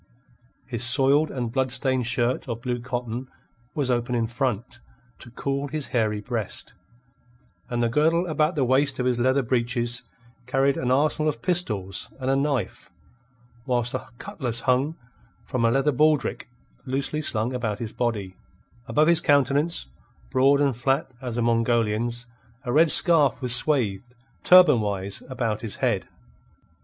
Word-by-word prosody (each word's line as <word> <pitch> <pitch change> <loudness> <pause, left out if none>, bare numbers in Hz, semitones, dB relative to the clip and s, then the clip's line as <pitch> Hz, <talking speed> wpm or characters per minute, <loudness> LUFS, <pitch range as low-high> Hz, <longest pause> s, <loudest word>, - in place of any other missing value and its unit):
His 120 -2 -3
soiled 135 +5 +4
and 120 -3 -4
blood 130 +1 0
stained 130 -2 0
shirt 120 +2 -1
of 115 0 -5
blue 125 -1 -2
cotton 120 0 -5 0.5
was 140 -4 0
open 120 0 -1
in 115 -1 +1
front, 120 -1 -3 0.4
to 120 - -12
cool 140 +3 -3
his 150 0 -5
hairy 110 -3 0
breast, 115 -3 -4 1.0
and 120 -1 -1
the - - +2
girdle 160 +8 +2
about 155 0 0
the 140 -4 +1
waist 135 +2 +2
of 125 - -2
his 125 -1 0
leather 130 +3 +2
breeches 120 0 0 0.5
carried 135 +1 +1
an 125 - -2
arsenal 150 +3 +2
of 120 -6 -6
pistols 105 - 0
and 130 0 -1
a - - +2
knife, 135 -10 -2 0.8
whilst 120 -2 0
a 130 - -5
cutlass 130 - -3
hung 135 +6 +1 0.5
from 125 -2 -2
a 115 - +4
leather 135 +5 +2
baldrick 150 0 +1 0.4
loosely 140 +3 -2
slung 115 -3 -2
about 115 -5 -2
his 110 -1 -6
body; 105 -6 -3 0.5
above 150 +2 +2
his 170 0 +4
countenance, 145 +2 +1 0.5
broad 135 - +4
and 140 -3 +1
flat 135 +3 -1
as 125 -2 -5
a 120 - 0
Mongolian's, 115 0 0 0.4
a 120 -3 -3
red 160 +3 +5
scarf 150 -6 +5
was 125 -2 +1
swathed, 125 -4 0 0.3
turban 175 -10 +6
wise, 100 -1 -3
about 115 -5 -2
his 110 -4 -4
head. - - -1
125 Hz, 150 wpm, -24 LUFS, 120-140 Hz, 1.0 s, turban